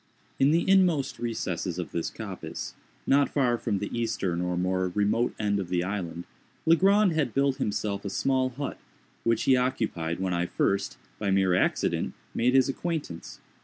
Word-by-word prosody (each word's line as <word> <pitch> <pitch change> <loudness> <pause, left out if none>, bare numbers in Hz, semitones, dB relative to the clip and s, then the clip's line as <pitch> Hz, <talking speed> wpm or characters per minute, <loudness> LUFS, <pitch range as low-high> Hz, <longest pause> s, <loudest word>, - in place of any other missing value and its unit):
In 135 - +5
the 165 +3 +2
inmost 180 -7 +3
recesses 110 -6 -3
of 90 - -4
this 85 - -2
coppice, - - -6 0.3
not 140 +1 +4
far 125 -4 +2
from 105 -4 -1
the 105 +4 -4
eastern 100 -7 -1
or 90 0 -1
more 95 +1 0
remote 105 +6 +1
end 100 -1 0
of 95 -3 -4
the 90 -1 +1
island, 90 -3 -4 0.4
Legrand 195 +4 +5
had 155 -3 -1
built 140 -1 +2
himself 100 -1 -2
a 100 - -3
small 130 +5 +1
hut, 135 +3 -5 0.4
which 115 -1 +2
he 130 - +5
occupied 110 -11 -1
when 95 -1 -1
I 85 0 0
first, 100 +2 0 0.2
by 100 - -1
mere 95 -1 +3
accident, 90 - +1 0.2
made 125 +3 +2
his 130 -1 +5
acquaintance. 145 - -4
110 Hz, 165 wpm, -27 LUFS, 95-135 Hz, 0.4 s, In